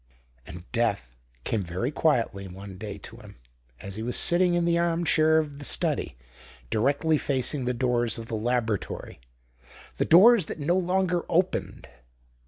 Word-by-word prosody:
And 85 0 -10
death 105 - -1 0.3
came 110 - -1
very 95 - -3
quietly 120 -10 0
one 95 +1 -10
day 105 -2 -6
to 100 - -11
him, - - -14 0.4
as 100 +1 -7
he - - -4
was 120 +2 -2
sitting 175 0 +3
in 175 -1 +1
the 170 0 +2
arm 170 0 0
chair 160 0 +4
of 145 -3 -2
the - - -8
study, - - 0 0.5
directly 145 +7 +1
facing 135 0 0
the 125 - 0
doors 120 -1 0
of 115 - -7
the 115 - -8
laboratory 115 -2 -3 0.8
the - - 0
doors 195 +1 +6
that - - -6
no 160 +5 +1
longer 180 -1 0
opened. 180 +2 -1
130 Hz, 160 wpm, -26 LUFS, 110-170 Hz, 0.8 s, doors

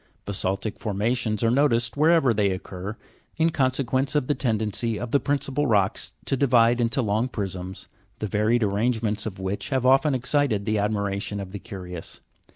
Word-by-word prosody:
Basa'ltic 100 +1 -2
formations 110 +1 -1
are 115 - +3
noticed 120 -3 +2
wherever 155 -4 +4
they 105 -2 +2
occur, 95 +2 -5 0.4
in 165 +1 +3
consequence 130 0 0
of 145 - +2
the 145 - +1
tendency 110 -3 -1
of 120 -1 -5
the 140 - +4
principal 145 0 -1
rocks 100 -5 +1
to - - +1
divide 120 -3 +4
into 120 +3 +1
long 110 +3 +1
prisms, 95 -5 -5 0.3
the - - -3
varied 105 +3 +1
arrangements 110 +1 0
of 95 - -6
which 95 +7 -4
have 130 -3 0
often 135 +2 +4
excited 125 -5 0
the 110 -1 +1
admiration 100 0 -1
of 95 -2 -6
the 100 - -6
curious. 90 -3 -8
115 Hz, 165 wpm, -25 LUFS, 100-130 Hz, 0.4 s, wherever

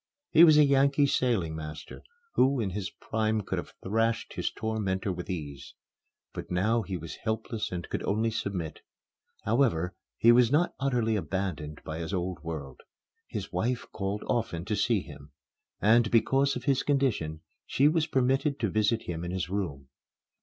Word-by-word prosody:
He 160 - +8
was 155 -3 +8
a 150 - +8
Yankee 140 +1 +4
sailing 115 - +1
master, 75 -1 -8 0.3
who 135 0 +3
in 100 -5 -1
his 100 0 -3
prime 110 -1 -1
could 95 - -3
have - - -9
thrashed 115 +3 0
his - - -1
tormentor 105 -3 -2
with 90 0 -7
ease. 75 -7 -6 0.6
But - - -7
now 110 +6 +2
he 95 -3 -4
was 80 -2 -8
helpless 110 0 -3
and 90 -2 -4
could - - -3
only 110 +3 0
submit. 95 -7 -4 0.6
However, 110 -7 +1 0.2
he 115 - +6
was 120 0 +5
not 165 +5 +2
utterly 120 -5 +1
abandoned 90 -7 -3
by 80 +1 -5
his 85 +4 -3
old 90 0 -3
world. 75 -6 -6 0.5
His - - -6
wife 125 +2 -1
called 100 0 -3
often 90 -8 -1
to 105 +1 -1
see 105 0 +2
him; 70 -4 -13 0.5
and, 110 +2 +4
because 135 +5 +3
of 125 - -5
his 135 -1 +2
condition, 115 - 0 0.3
she 140 - +3
was 160 0 +2
permitted 135 +2 +1
to 110 -5 0
visit 110 +2 +1
him 85 -1 -4
in 85 - -4
his 90 0 -3
room. 75 -10 -3
110 Hz, 165 wpm, -29 LUFS, 90-125 Hz, 0.6 s, He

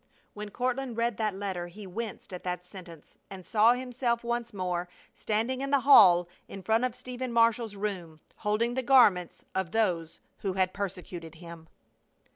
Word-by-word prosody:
(When 210 0 -7
Courtland 250 +2 -2
read 235 -2 0
that 215 -3 -1
letter 190 -3 -4
he 200 +4 -11
winced 205 +1 -6
at 180 - -7
that 180 0 -4
sentence 175 -4 -13
and 190 -2 -10
saw 225 +2 +4
himself 245 -1 -2
once 235 0 -2
more 180 -2 -3 0.2
standing 230 +5 -1
in 275 - -2
the 280 -1 +3
hall 180 -10 +7 0.2
in 195 - -9
front 225 +4 +2
of 250 -2 -3
Stephen 255 0 -6
Marshall's 230 -2 +2
room, 185 -6 -5 0.2
holding 225 +3 0
the 260 - -1
garments 235 -9 +4
of 190 -2 -1
those 175 -6 -1 0.2
who 190 -2 -3
persecuted 185 -3 -3
him.) 165 -1 -12
210 Hz, 160 wpm, -29 LUFS, 180-235 Hz, 0.2 s, hall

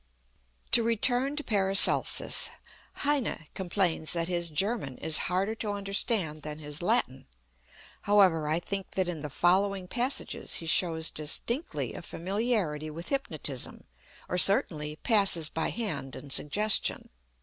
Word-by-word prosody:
To 235 - +7
return 245 +4 +3
to 300 - -3
PARACELSUS, 195 -4 +3 0.6
HEINE 280 - -1
complains 180 -4 -1
that 165 -1 -2
his 170 -1 -1
German 175 - -2
is 155 -1 -1
harder 190 +4 -1
to 215 -2 -4
understand 195 -5 -1
than 150 0 -7
his 150 +1 -7
Latin. 175 - -1 0.7
However, 190 -7 +3
I 155 +2 0
think 195 +2 -6
that 185 -2 -1
in 170 -4 -5
the 150 - -6
following 185 +4 0
passages 250 +6 -1
he 165 - -2
shows 160 -1 +1
distinctly 150 - -2
a - - -8
familiarity 180 -4 -2
with 165 +3 -8
hypnotism, 155 - -3 0.4
or 180 - +1
certainly, 150 -6 +3
passes 195 -5 +3
by 160 - -3
hand 195 - -4
and 140 -2 -7
suggestion. 210 +8 +2
180 Hz, 130 wpm, -28 LUFS, 155-210 Hz, 0.7 s, To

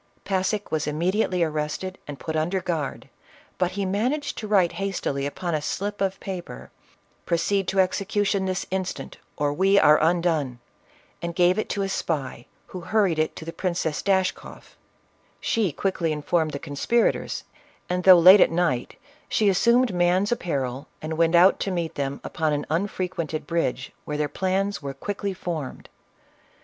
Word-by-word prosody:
Passick 195 +2 -1
was 155 -2 -1
immediately 180 +4 +1
arrested 155 +4 -3
and 145 -2 -7
put 160 - -4
under 170 +5 0
guard, 165 -6 -3 0.5
but 180 0 +1
he 200 0 -2
managed 240 +10 -1
to 215 - -5
write 190 -5 +3
hastily 145 -8 -2
upon 170 +4 -4
a 155 - 0
slip 205 +7 -3
of 195 -1 0
paper, 185 -3 -7 0.6
"Proceed 185 +3 +1
to 195 - 0
execution 195 +1 +1
this 185 -1 -2
instant 185 -1 -4 0.2
or 145 -1 0
we 195 +5 +3
are 150 -5 +6
undone 160 -6 +1 0.3
!" - - -32
and 170 0 -4
gave 180 +3 +3
it - - -3
to 200 - -1
a - - -1
spy, 140 -10 -3 0.2
who 185 - -8
hurried 185 -3 +1
with 155 - +4
it - - -13
to 160 - -8
the 165 - -6
Princess 170 -4 -2
Dashkoff. 190 -2 -1 0.6
She 215 -7 0
quickly 175 0 -1
informed 155 +1 0
the - - -2
conspirators, 145 +13 0 0.4
and, 180 0 -1
though 185 -1 +9
late 185 +4 +9
at - - +6
night, 165 -8 0 0.3
she 210 -2 +3
assumed 235 +4 +3
man's 180 +3 +2
apparel, 140 - -2
and 155 +1 -4
went 165 +1 +3
out 180 +3 +6
to - - -2
meet 170 -3 -2
them 140 0 -3
upon 155 -2 -1
an 145 0 -2
unfrequented 170 -3 -2
bridge, 150 -5 -1
where 150 - -3
their 150 0 0
plans 190 +6 -1
were 140 -1 -5
quickly 200 -1 -4
formed. 165 -7 -5
175 Hz, 165 wpm, -25 LUFS, 155-195 Hz, 0.6 s, though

